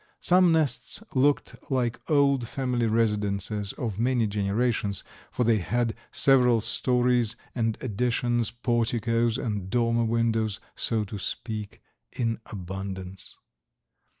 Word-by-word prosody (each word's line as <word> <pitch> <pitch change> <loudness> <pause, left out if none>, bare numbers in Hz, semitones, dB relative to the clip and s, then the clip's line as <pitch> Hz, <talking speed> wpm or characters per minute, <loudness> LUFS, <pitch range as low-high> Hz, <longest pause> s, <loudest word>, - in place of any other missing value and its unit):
Some 180 -1 +5
nests 160 +6 0
looked 140 +2 +2
like 125 -3 0
old 140 -5 +3
family 125 -3 -1
residences 105 -2 0
of 110 -5 -4
many 120 -1 +2
generations, 105 0 0 0.3
for - - -1
they 115 -2 +3
had 115 +5 0 0.2
several 125 -4 +4
stories 125 0 +1 0.2
and 115 -3 0
additions, 120 0 0
porticos 115 -1 0
and 105 -5 -3
dormer 115 +1 +2
windows, 115 -2 0 0.2
so 110 -2 0
to 105 0 -6
speak, 105 +1 -5 0.3
in 115 -2 -1
abundance. 95 -1 -7
115 Hz, 110 wpm, -27 LUFS, 105-125 Hz, 0.3 s, Some